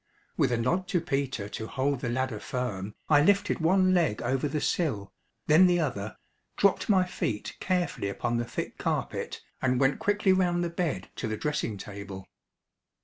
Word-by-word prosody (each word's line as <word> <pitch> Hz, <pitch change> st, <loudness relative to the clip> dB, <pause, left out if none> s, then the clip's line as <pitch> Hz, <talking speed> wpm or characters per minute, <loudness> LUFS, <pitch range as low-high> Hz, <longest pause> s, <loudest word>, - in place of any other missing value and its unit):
With -, -, +2 dB
a 120 Hz, -, +2 dB
nod 175 Hz, +11 st, 0 dB
to 175 Hz, -, +1 dB
Peter 135 Hz, -9 st, -2 dB
to 110 Hz, +1 st, -5 dB
hold 140 Hz, +1 st, 0 dB
the 125 Hz, -, -3 dB
ladder 130 Hz, -2 st, -1 dB
firm 105 Hz, -5 st, -4 dB
I 145 Hz, -2 st, +6 dB
lifted 200 Hz, +5 st, +3 dB
one 185 Hz, +3 st, +4 dB
leg 165 Hz, -, +2 dB
over 130 Hz, +4 st, 0 dB
the 150 Hz, +1 st, -1 dB
sill, 135 Hz, -, -1 dB, 0.3 s
then 165 Hz, +5 st, +7 dB
the 175 Hz, -1 st, +3 dB
other, 110 Hz, -9 st, -2 dB, 0.4 s
dropped 200 Hz, +2 st, +2 dB
my 190 Hz, -3 st, +5 dB
feet 110 Hz, -10 st, -3 dB
carefully 175 Hz, -, -1 dB
upon 120 Hz, +4 st, -1 dB
the 120 Hz, -, -1 dB
thick -, -, -5 dB
carpet -, -, -2 dB, 0.2 s
and 130 Hz, -1 st, +2 dB
went 135 Hz, 0 st, +2 dB
quickly 205 Hz, -2 st, +3 dB
round 175 Hz, -2 st, +2 dB
the 170 Hz, -, -2 dB
bed 160 Hz, -, -2 dB
to 115 Hz, -, -2 dB
the 110 Hz, 0 st, -2 dB
dressing 150 Hz, -8 st, -2 dB
table. 100 Hz, -1 st, -8 dB
135 Hz, 175 wpm, -28 LUFS, 110-175 Hz, 0.4 s, then